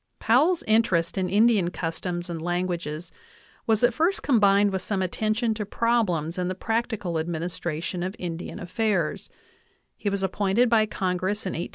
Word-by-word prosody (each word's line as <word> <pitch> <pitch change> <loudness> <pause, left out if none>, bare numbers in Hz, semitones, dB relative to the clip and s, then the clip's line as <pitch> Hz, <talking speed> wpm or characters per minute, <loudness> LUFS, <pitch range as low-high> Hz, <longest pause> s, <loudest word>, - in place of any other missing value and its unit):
Powell's 310 +10 +3
interest 190 -7 +2
in 185 -2 -1
Indian 210 -3 +4
customs 175 +1 -4
and 170 -2 -5
languages 175 -2 -3 0.6
was 220 0 +2
at 245 0 +5
first 335 - +1
combined 205 -5 +4
with 190 -1 -2
some 190 0 -1
attention 215 +5 0
to 215 -1 -3
problems 200 -7 0
in 180 - 0
the 185 - -2
practical 220 -5 -2
administration 170 +1 -3
of 185 +3 -3
Indian 175 -4 -5
affairs; 205 +4 -1 0.7
he 205 - -2
was 200 -1 -2
appointed 200 +5 +2
by 220 -2 +4
Congress 190 +1 -2
in 185 - -1
1872 170 - -4
190 Hz, 155 wpm, -25 LUFS, 175-220 Hz, 0.7 s, at